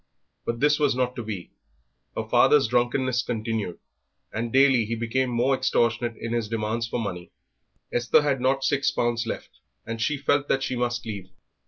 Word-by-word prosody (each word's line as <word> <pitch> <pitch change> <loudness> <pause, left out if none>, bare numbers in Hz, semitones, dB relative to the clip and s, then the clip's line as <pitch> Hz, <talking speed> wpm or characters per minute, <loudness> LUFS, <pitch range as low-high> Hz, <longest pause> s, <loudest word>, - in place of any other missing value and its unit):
But 115 0 -2
this 150 +1 +4
was 145 -4 +2
not 125 0 0
to 120 - -4
be; 105 -5 -6 0.7
her - - -2
father's - - +5
drunkenness 125 +1 +1
continued, 110 -5 -3 0.6
and 115 +1 -2
daily 130 -2 +5
he 115 +2 -2
became 120 +3 0
more 120 +3 +2
extortionate 120 -2 +1
in 115 0 -4
his 115 -3 -1
demands 115 +1 -1
for 120 - -2
money. 90 -5 -5 0.6
Esther 120 +4 +3
had 140 -3 0
not 135 +1 +1
six 145 +1 +2
pounds 120 -3 0
left, - - -6 0.3
and 115 0 -5
she 150 +5 +1
felt 145 0 +1
that 135 - +1
she 130 -1 -2
must 120 -1 -1
leave. 100 -4 -6
120 Hz, 175 wpm, -25 LUFS, 115-130 Hz, 0.7 s, father's